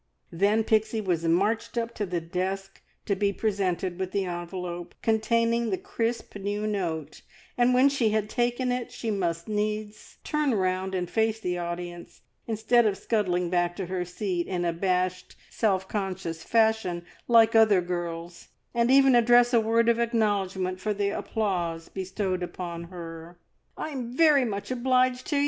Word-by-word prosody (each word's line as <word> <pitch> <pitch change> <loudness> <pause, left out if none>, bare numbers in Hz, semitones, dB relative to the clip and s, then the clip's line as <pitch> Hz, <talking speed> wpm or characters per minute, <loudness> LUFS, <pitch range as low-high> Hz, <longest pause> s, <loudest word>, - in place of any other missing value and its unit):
Then 200 +6 +2
Pixie 220 +1 +1
was 175 -5 -1
marched 200 +9 +1
up 235 0 -1
to 210 -3 -3
the 175 -1 -1
desk 190 +3 -4 0.2
to 200 - +1
be 200 +1 +1
presented 190 -4 -1
with 190 0 -3
the 195 -1 0
envelope 175 0 -5
containing 230 +1 +2
the 375 - 0
crisp 240 - -3
new 205 +1 -3
note, 165 -8 -3 0.3
and 245 0 +3
when 255 +2 +6
she 270 -5 +2
had 215 -1 0
taken 245 +2 0
it 250 0 -3
she 235 -2 -3
must 170 -4 -2
needs 210 0 -3
turn 300 -5 0
round 185 0 0
and 180 -1 -1
face 220 +3 0
the 180 -4 -2
audience, 175 0 -6 0.3
instead 225 +1 +3
of 200 -2 0
scuttling 180 -6 0
back 175 -1 +1
to 190 - -4
her 180 0 -2
seat 180 0 -3
in 175 -2 -2
abashed, 180 +1 -1 0.2
self 190 -4 0
conscious 190 -5 -4
fashion 220 -6 +1 0.2
like 230 -1 +6
other 220 -4 +6
girls, 175 -1 -5 0.3
and 235 0 +2
even 270 0 +6
address 240 +1 +5
a 230 - +5
word 230 +1 +2
of 235 0 +3
acknowledgment 200 -5 0
for 210 +2 -2
the 200 0 0
applause 175 -6 -2
bestowed 190 -1 -3
upon 170 -1 -5
her. 170 -1 -9 0.4
"I'm 255 -5 -5
very 300 -5 +5
much 205 +1 -4
obliged 255 0 +1
to 295 - -1
ye!" - - +3
200 Hz, 160 wpm, -27 LUFS, 180-230 Hz, 0.4 s, when